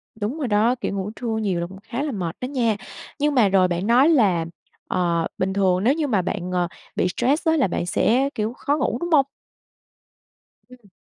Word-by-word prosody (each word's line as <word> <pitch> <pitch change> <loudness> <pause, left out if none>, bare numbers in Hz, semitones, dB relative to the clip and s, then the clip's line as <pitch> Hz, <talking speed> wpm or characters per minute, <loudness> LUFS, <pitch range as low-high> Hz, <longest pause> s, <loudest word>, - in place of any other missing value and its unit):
Đúng 220 +7 -3
rồi 285 - -2
đó, 220 +3 +3
kiểu, - - -2
ngủ 195 +2 -3
trưa 225 -3 -3
nhiều 195 -5 -1
là 170 - -3
cũng 190 +1 -12
khá 240 +5 -4
là 300 - -2
mệt 180 -7 -4
đó - - -2
nha. 245 -5 0 0.4
Nhưng 295 0 +1
mà 220 -6 +5
rồi 185 -1 +4
bạn 180 +3 -2
nói 255 +7 +5
là, 195 - +3 0.4
ờ, 170 -2 0
bình 190 +1 -1
thường 190 -2 +2
nếu 255 +5 +4
như 310 -1 -1
mà 210 -8 +2
bạn, 180 0 -4
ờ, 180 -1 +1 0.3
bị - - +1
stress 285 +8 +1
á, 320 0 +4
là 275 - +3
bạn 175 - -2
sẽ, 250 +9 +2
kiểu, 220 +2 -2
khó 285 +3 -1
ngủ 265 -5 0
đúng 345 - -3
hông? 285 -4 +5 1.4
Ừm. 245 -5 -17
220 Hz, 220 wpm, -23 LUFS, 185-265 Hz, 1.4 s, mà